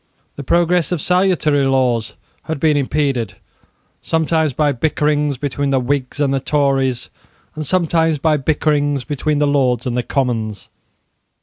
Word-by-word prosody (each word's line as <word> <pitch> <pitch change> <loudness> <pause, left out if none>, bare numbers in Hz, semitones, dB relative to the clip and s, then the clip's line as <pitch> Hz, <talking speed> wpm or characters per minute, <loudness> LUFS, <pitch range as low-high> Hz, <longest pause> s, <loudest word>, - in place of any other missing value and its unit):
The 140 - -7
progress 175 +3 +1
of 175 - 0
salutary 170 -5 +2
laws 125 -4 0 0.3
had 160 -2 -3
been 155 0 +3
impeded, 135 -7 -1 0.7
sometimes 160 -1 0
by 145 +3 +1
bickerings 150 +1 0
between 140 +1 -2
the 135 -1 +2
Whigs 130 +1 -2
and 140 -2 +1
the 135 - +1
Tories, 135 -3 0 0.4
and 155 - -5
sometimes 165 -3 +2
by 155 +1 +2
bickerings 145 -1 0
between 150 +2 -1
the 150 - +2
Lords 130 -4 +1
and 125 -2 -2
the 125 - +1
Commons. 115 -6 -2
145 Hz, 140 wpm, -18 LUFS, 130-155 Hz, 0.7 s, been